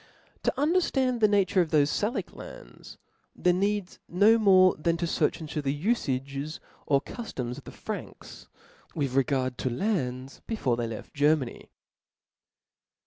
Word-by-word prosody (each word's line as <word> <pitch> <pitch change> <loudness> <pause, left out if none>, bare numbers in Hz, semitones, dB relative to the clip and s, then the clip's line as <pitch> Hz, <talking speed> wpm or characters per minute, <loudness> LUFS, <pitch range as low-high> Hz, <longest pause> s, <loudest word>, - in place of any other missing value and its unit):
To - - +1
underftand 275 -6 +1
the 215 - +5
nature 195 -2 +3
of 170 - -1
thofe 150 -2 +4
Salic 210 - -2
lands, - - -11 0.4
there 180 - +2
needs 200 0 -1
no 210 +6 +5
more 185 -3 +6
than 165 +2 0
to 170 - -1
fearch 165 - +1
intcf 155 -1 -4
the 140 +1 -2
ufagcs 140 - -1 0.3
or 140 -1 +3
cuftoms 130 - -6
of - - -17
the - - -9
Franks - - -8 0.5
with 140 -5 -1
regard 130 -2 0
to 130 - -1
lands, 130 - -2
before 145 - 0
they 120 -1 -2
left 115 -1 -8
Germany. 145 -3 +1
160 Hz, 140 wpm, -27 LUFS, 135-210 Hz, 0.5 s, more